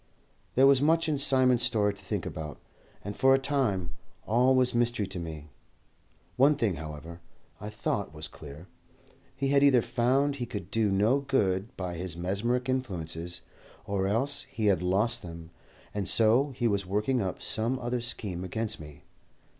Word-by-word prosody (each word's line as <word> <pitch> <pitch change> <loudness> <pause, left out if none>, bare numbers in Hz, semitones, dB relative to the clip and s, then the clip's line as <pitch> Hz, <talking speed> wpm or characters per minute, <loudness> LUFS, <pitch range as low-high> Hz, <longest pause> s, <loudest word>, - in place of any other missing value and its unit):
There 130 - +6
was 135 -1 +5
much 165 +2 +3
in 150 -3 0
Simon's 130 -3 +4
story 105 -4 +2
to 100 - -15
think 100 -2 -3
about, 75 -2 -6 0.5
and 100 +1 -5
for 135 +3 +5
a - - +3
time 130 -11 -1 0.3
all 125 +4 +3
was 125 -1 +3
mystery 120 -2 +1
to 95 -1 -6
me. 80 -3 -7 0.9
One 140 +4 +5
thing, 105 - 0
however, 80 +2 -8 0.4
I 105 - -6
thought 105 -2 -2
was 75 0 -6
clear. 75 +2 -11 0.7
He 135 +1 -1
had 140 0 +4
either 130 -5 +5
found 135 +4 +1
he 120 -2 -4
could 100 -5 -7
do 110 -2 +2
no 105 +8 +3
good 115 -5 0
by 90 -2 -4
his 90 -1 -4
mesmeric 110 +8 -1
influences, 90 -9 -3 0.4
or 95 -1 -1
else 130 +8 0
he 115 -5 -3
had 95 -4 +3
lost 100 +6 +1
them, 85 -1 -9 0.4
and 100 -3 -2
so 115 +6 +3
he 120 -1 +1
was 100 -2 0
working 105 +6 0
up 95 -2 -3
some 115 +4 -1
other 120 -1 -2
scheme 100 -6 -3
against 110 +4 -3
me. 75 -2 -12
105 Hz, 170 wpm, -28 LUFS, 90-130 Hz, 0.9 s, There